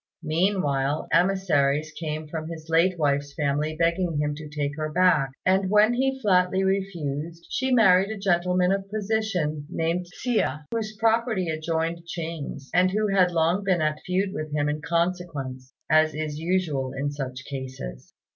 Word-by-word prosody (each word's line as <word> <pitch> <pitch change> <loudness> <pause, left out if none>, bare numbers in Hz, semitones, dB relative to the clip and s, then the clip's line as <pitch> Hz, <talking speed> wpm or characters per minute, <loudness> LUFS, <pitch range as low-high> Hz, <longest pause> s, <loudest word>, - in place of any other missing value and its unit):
Meanwhile 155 -4 0
emissaries 155 -6 +2
came 155 -1 -5
from 155 0 -5
his 160 -1 -8
late 170 +3 +3
wife's 145 -2 0
family 150 +1 0
begging 170 -1 +1
him 150 0 0
to 150 +1 -8
take 145 -1 -3
her 155 0 -3
back; 165 -5 +3 0.2
and 190 0 +3
when 210 +3 +5
he 265 +2 0
flatly 185 -2 +3
refused, 170 -4 -2
she 260 0 0
married 195 -5 +5
a 220 - -4
gentleman 180 -1 +2
of 195 0 -2
position 195 -8 -1
named 170 +1 -1
Hsia, 175 - -1
whose 215 -1 -3
property 225 -4 +1
adjoined 165 +1 -2
Ching's, 160 -5 -6
and 180 +1 +4
who 210 +2 0
had 190 -2 +4
long 170 +3 +1
been 185 -4 +2
at 155 0 0
feud 190 +1 -1
with 155 -1 -5
him 145 0 0
in 150 +1 -2
consequence, 165 -7 -2 0.2
as 155 -1 +3
is 155 -1 -3
usual 160 -7 -1
in 145 +1 -1
such 130 -3 -6
cases. 130 - -7
165 Hz, 155 wpm, -25 LUFS, 150-190 Hz, 0.2 s, when